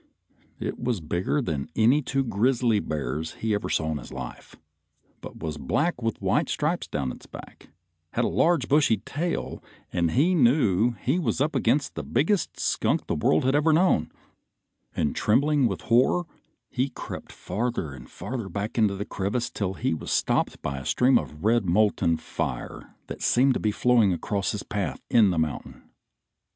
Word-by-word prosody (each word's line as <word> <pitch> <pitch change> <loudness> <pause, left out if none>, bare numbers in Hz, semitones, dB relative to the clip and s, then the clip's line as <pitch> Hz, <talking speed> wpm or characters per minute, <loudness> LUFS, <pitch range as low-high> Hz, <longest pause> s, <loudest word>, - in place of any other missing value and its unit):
It - - -4
was 120 -4 -1
bigger 85 - -1
than 75 -10 -3
any 120 +7 +4
two 135 0 -1
grizzly 120 0 +2
bears 80 -1 -3
he 110 -1 -2
ever 105 - -2
saw 80 0 0
in 75 - -2
his - - -11
life, 65 -2 -8 0.7
but - - -10
was 75 -2 -4
black 145 - 0
with 115 -1 -2
white - - +1
stripes - - -1
down 70 -3 -2
its - - -12
back, - - -12 0.4
had - - +1
a - - +2
large 170 -5 +2
bushy 140 -6 +4
tail, 155 - -4 0.3
and 85 -1 +1
he 150 - +3
knew 120 - +3
he 145 +8 +1
was 125 -8 -1
up 145 +2 0
against 130 +3 +1
the - - -4
biggest 185 +6 0
skunk - - 0
the - - -2
world 80 - +2
had 130 - +3
ever 150 +2 +3
known, 155 - +3 0.8
and 75 - 0
trembling 140 +4 +3
with - - -4
horror 130 +9 +3 0.5
he 130 +2 0
crept 125 - -8
farther 100 - -3
and 65 -2 -12
farther 120 -6 -5
back 100 +5 -3
into 105 -3 +3
the 100 +1 -4
crevice 110 +5 -2
till 95 -2 -3
he 80 - -1
was 80 - -5
stopped - - +1
by 70 -1 -3
a - - -8
stream 130 +1 +4
of 75 +1 -9
red 115 +1 +3
molten 90 -3 +2
fire 80 - -5
that - - -8
seemed 130 +2 +4
to - - -2
be 105 - +1
flowing 115 -2 +3
across 100 +3 -1
his - - -4
path - - -3
in 110 -4 +6
the 90 - -1
mountain. 80 -2 -3
110 Hz, 175 wpm, -26 LUFS, 85-135 Hz, 0.8 s, in